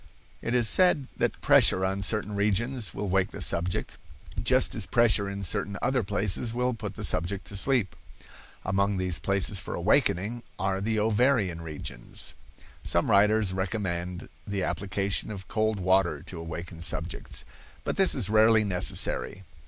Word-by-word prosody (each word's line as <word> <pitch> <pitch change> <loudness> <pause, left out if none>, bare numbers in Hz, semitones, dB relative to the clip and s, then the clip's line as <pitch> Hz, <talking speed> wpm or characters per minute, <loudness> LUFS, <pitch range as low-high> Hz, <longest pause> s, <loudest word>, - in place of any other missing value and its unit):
It 120 - -2
is 120 -2 +2
said 170 - +3
that - - -1
pressure 95 +1 +5
on 95 +1 -2
certain 105 +1 +1
regions 105 +3 0
will 105 - -5
wake 95 0 +1
the - - -9
subject, 90 +2 -1 0.4
just 130 +3 +3
as 105 -5 -1
pressure 105 -2 +3
in 100 0 -6
certain 100 +3 0
other 130 -1 0
places 105 +3 0
will 125 +1 0
put 105 -3 -7
the - - -7
subject 95 +4 -1
to 100 - -9
sleep. 115 -2 +1 0.7
Among 100 +1 0
these 90 -2 -1
places 100 0 +2
for - - -6
awakening 105 +7 +1 0.2
are 95 0 -1
the 110 +2 -1
ovarian 105 -5 +1
regions. 75 -6 -4 0.5
Some 85 +6 0
writers 105 -1 +3
recommend 90 -2 -4 0.2
the 100 -2 -2
application 100 +1 -2
of 95 -2 -8
cold 110 -2 0
water 90 -5 +1
to 90 -1 -7
awaken 85 +1 -7
subjects, 85 - -2 0.4
but - - -3
this 195 -1 +3
is 120 -9 +1
rarely 110 +1 +4
necessary. 95 0 +1
100 Hz, 155 wpm, -27 LUFS, 95-110 Hz, 0.7 s, pressure